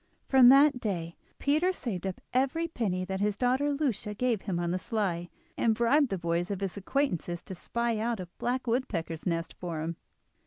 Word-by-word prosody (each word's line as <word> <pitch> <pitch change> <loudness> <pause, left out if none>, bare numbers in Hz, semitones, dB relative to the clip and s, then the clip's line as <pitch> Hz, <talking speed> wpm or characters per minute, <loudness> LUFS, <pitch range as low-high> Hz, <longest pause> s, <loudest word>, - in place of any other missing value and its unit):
From 260 -2 +8
that 275 0 +6
day 170 -7 -3 0.2
Peter 310 +6 +2
saved 205 - -4
up 190 - -5
every 275 +6 +1
penny 195 - -2
that 190 0 -3
his 205 0 0
daughter 260 +4 +2
Lucia 240 -8 -1
gave 235 -2 0
him 185 -4 -2
on 170 0 -1
the 185 - -1
sly, 180 -5 -2 0.3
and 225 -2 +3
bribed 255 +5 +3
the 195 - -1
boys 170 0 -1
of 200 -1 -3
his 195 -2 -2
acquaintance 190 - -1
to 190 - -8
spy 235 +4 -2
out 230 0 -1
a 185 - -4
black 255 +2 -1
woodpecker's 195 -10 -2
nest 165 -1 -1
for 170 -3 -4
him. 165 +1 -3
210 Hz, 190 wpm, -29 LUFS, 180-255 Hz, 0.3 s, From